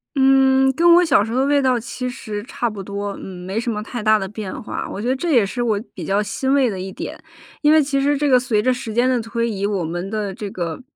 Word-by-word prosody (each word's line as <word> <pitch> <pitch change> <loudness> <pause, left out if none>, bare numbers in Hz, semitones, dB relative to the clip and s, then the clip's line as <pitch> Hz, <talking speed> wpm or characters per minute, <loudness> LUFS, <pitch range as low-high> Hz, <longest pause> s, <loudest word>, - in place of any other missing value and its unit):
嗯， 265 0 +4
跟 340 +4 +5
我 355 0 +5
小 275 -9 +4
时 225 - -5
候 250 - 0
的 270 - +2
味 285 0 +3
道 255 -2 +2
其 250 +1 -5
实 210 -4 -6
差 240 0 -3
不 200 -2 -7
多， 200 +1 -4
嗯， 180 -1 -9
没 195 +3 -4
什 235 +1 -1
么 210 -1 -3
太 235 +1 -6
大 215 0 +4
的 195 - -3
变 205 -1 -6
化， - - -4
我 200 - -5
觉 235 - -3
得 260 - +2
这 330 +5 -2
也 235 -7 +4
是 240 +5 -4
我 215 -4 +1
比 180 - -7
较 195 +5 +1
欣 265 +6 -1
慰 270 -4 +3
的 195 - -4
一 190 +1 -5
点。 - - -7 0.4
因 300 0 +4
为 315 0 +6
其 275 -1 0
实 285 +1 +2
这 295 - 0
个 255 -2 +6
随 240 -4 +1
着 255 +3 +2
时 245 -4 -6
间 245 +2 +2
的 250 -2 +1
推 230 +1 -2
移， 200 -2 -2
我 200 -5 -1
们 175 +4 -4
的 210 -3 -3
这 205 -2 -5
个， 170 +1 -4
230 Hz, 300 characters per minute, -20 LUFS, 200-265 Hz, 0.4 s, 为